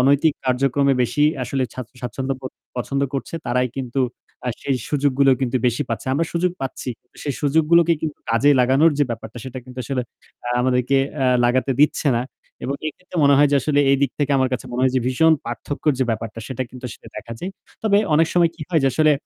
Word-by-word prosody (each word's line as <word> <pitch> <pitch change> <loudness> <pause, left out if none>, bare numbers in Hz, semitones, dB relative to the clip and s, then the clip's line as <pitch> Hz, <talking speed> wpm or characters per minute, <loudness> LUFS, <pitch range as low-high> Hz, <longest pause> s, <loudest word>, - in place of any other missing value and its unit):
অনৈতিক 140 +4 +4
কার্যক্রমে 135 +2 +2
বেশি 145 +4 0 0.2
আসলে 135 +1 -1
স্বাচ্ছ 125 -2 -7
স্বাচ্ছন্দ্য 130 +2 -3
বোদ 130 - -7 0.2
পছন্দ 135 +3 -2
করছে 135 - -4
তারাই 125 +1 +1
কিন্তু 130 0 -2 0.5
আ - - +1
সেই 135 -2 0
সুযোগগুলোই 140 -2 +3
কিন্তু 130 0 0
বেশি 120 +4 +1
পাচ্ছে। 115 +3 -4
আমরা 165 +5 +1
সুযোগ 175 +1 +1
পাচ্ছি 130 -1 -5
কিন্তু 125 - -29
সেই 140 -3 -2
সুযোগগুলোকে 160 +3 +4
কিন্তু 155 -2 -3
কাজে 125 +6 +4
লাগানোর 135 +6 +5
যে 145 - +4
ব্যাপারটা 115 +1 -6
সেটা 130 0 -6
কিন্তু 125 0 -11
আসলে 130 -1 -1 0.4
আ - - -1
আমাদেরকে 125 +1 +2 0.3
আ - - +3 0.2
লাগাতে 130 +2 +2
দিচ্ছে 150 0 +3
না। 120 - 0 0.4
এবং 140 - -1
এক্ষেত্রে 180 +3 -10
মনে 140 0 +6
হয় 145 0 +6
যে 145 - +4
আসলে 145 -2 +2
এই 140 - +5
দিক 140 - +2
থেকে 145 -1 +1
আমার 130 -1 +2
কাছে 125 - -2
মনে 125 - -2
হয় 130 -1 +3
যে - - +3
ভীষণ 160 +5 +4
পার্থক্যর 145 +5 -2
যে 130 - +2
ব্যাপারটা 115 0 -4
সেটা 130 0 -3
কিন্তু 125 0 -11
আসলে - - -13
দেখা 115 - -7
যায়। 185 - -4 0.3
তবে 205 -2 +4 0.2
অনেক 160 +1 +4
সময় 170 -2 +4
কি 160 - -8
হয় 160 - +3
যে - - +5
আসলে 155 -1 +4
135 Hz, 210 wpm, -21 LUFS, 125-150 Hz, 0.5 s, মনে